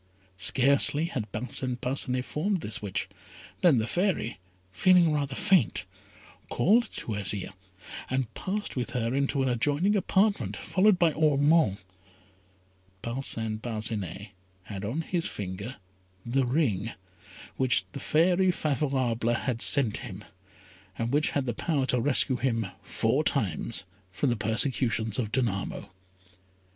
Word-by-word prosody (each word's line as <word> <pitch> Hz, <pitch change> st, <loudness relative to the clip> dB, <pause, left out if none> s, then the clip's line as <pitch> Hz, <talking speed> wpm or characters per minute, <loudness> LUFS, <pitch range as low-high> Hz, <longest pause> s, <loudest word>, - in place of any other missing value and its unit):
Scarcely 140 Hz, -, +3 dB
had 125 Hz, -10 st, -4 dB
Parcin 125 Hz, +2 st, -2 dB
Parcinet 125 Hz, 0 st, 0 dB
formed 185 Hz, +4 st, -1 dB
this 110 Hz, -, -3 dB
wish, 100 Hz, -2 st, -3 dB, 0.5 s
than 170 Hz, -8 st, +5 dB
the 110 Hz, -, +1 dB
Fairy, 175 Hz, -, -1 dB, 0.3 s
feeling 175 Hz, -, +4 dB
rather 140 Hz, -2 st, -1 dB
faint, 180 Hz, -, +2 dB, 0.6 s
called 230 Hz, +6 st, +3 dB
to -, -, -5 dB
Azire, 100 Hz, -1 st, -1 dB, 0.6 s
and 130 Hz, -3 st, -1 dB
passed 205 Hz, +2 st, -4 dB
with 120 Hz, -2 st, -3 dB
her 115 Hz, 0 st, -1 dB
into 140 Hz, 0 st, +1 dB
an -, -, +1 dB
adjoining 145 Hz, -, +1 dB
apartment, 200 Hz, +1 st, +1 dB
followed 195 Hz, 0 st, +3 dB
by 170 Hz, -3 st, +3 dB
Ormond. 150 Hz, -, +3 dB, 1.3 s
Parcin 115 Hz, -3 st, -3 dB
Parcinet 105 Hz, -4 st, -4 dB, 0.3 s
had 95 Hz, 0 st, -7 dB
on 120 Hz, +11 st, -2 dB
his 170 Hz, +1 st, -2 dB
finger 100 Hz, +6 st, -5 dB, 0.5 s
the 125 Hz, +2 st, +1 dB
ring 115 Hz, -, 0 dB, 0.6 s
which 130 Hz, -7 st, +2 dB
the -, -, -7 dB
fairy 180 Hz, +4 st, +3 dB
Favourable 130 Hz, -8 st, 0 dB
had 120 Hz, -1 st, -2 dB
sent 130 Hz, -6 st, +3 dB
him, 105 Hz, -6 st, -8 dB, 0.7 s
and 115 Hz, +1 st, -2 dB
which 150 Hz, +2 st, +2 dB
had 140 Hz, -2 st, -1 dB
the 120 Hz, -, -1 dB
power 140 Hz, +2 st, 0 dB
to 125 Hz, -2 st, +1 dB
rescue 130 Hz, -1 st, +2 dB
him 115 Hz, -4 st, 0 dB, 0.2 s
four -, -, 0 dB
times 105 Hz, -4 st, -1 dB, 0.3 s
from 125 Hz, +8 st, 0 dB
the -, -, +1 dB
persecutions 110 Hz, 0 st, 0 dB
of 110 Hz, -4 st, -2 dB
Danamo. 105 Hz, -9 st, -2 dB
130 Hz, 130 wpm, -28 LUFS, 110-150 Hz, 1.3 s, than